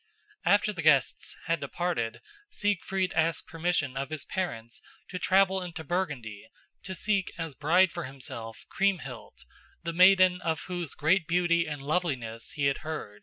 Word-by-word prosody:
After 205 +1 +4
the 175 - -4
guests 140 -4 +2
had 165 -1 +1
departed, 140 -6 -2 0.3
Siegfried 195 - -1
asked 160 +1 +1
permission 165 -5 -1
of 135 0 -3
his 155 -1 -5
parents 115 -12 -4 0.3
to 180 - -4
travel 190 0 +3
into 175 -2 -6
Burgundy 140 - -3 0.4
to 190 - -4
seek 200 +1 0
as 165 -3 -4
bride 170 +6 +4
for - - -5
himself 125 -4 -8
Kriemhild, 175 - -2 0.4
the 170 0 -3
maiden 185 0 +6
of 165 -2 -1
whose 175 -4 -5
great 165 +2 +2
beauty 170 0 +2
and 145 -3 -5
loveliness 135 -8 -2
he 145 - -1
had 140 0 +2
heard. 155 -10 -6
165 Hz, 150 wpm, -29 LUFS, 140-185 Hz, 0.4 s, maiden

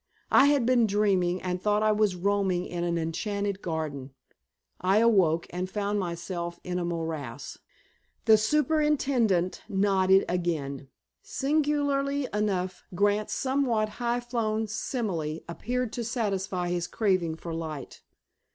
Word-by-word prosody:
I - - +7
had 285 -4 +3
been 240 -2 +4
dreaming, 190 -3 +1
and 180 -1 -2
thought 210 +1 +2
I 215 - +4
was 210 -3 +2
roaming 190 -1 0
in 175 -1 -4
an 170 -1 0
enchanted 200 +4 -2
garden. 145 -5 -4 0.7
I 190 +3 +3
awoke, 190 -8 +4
and 180 +1 -3
found 205 +1 -1
myself 170 -1 -4
in 180 0 -2
a - - -2
morass." 160 -7 -4 0.7
The 220 - +8
superintendent 275 - +1
nodded 190 -1 +3
again. 150 -6 -2 0.3
Singularly 285 -1 0
enough, 190 -3 -1
Grant's 205 +2 +1
somewhat 260 -5 +1
high 240 0 0
flown 225 -2 -1
simile 200 - -3
appeared 245 +7 -3
to 240 - -3
satisfy 195 -6 -2
his 175 -1 -1
craving 185 -7 0
for 165 0 -7
light. 155 -4 -6
195 Hz, 125 wpm, -27 LUFS, 175-225 Hz, 0.7 s, The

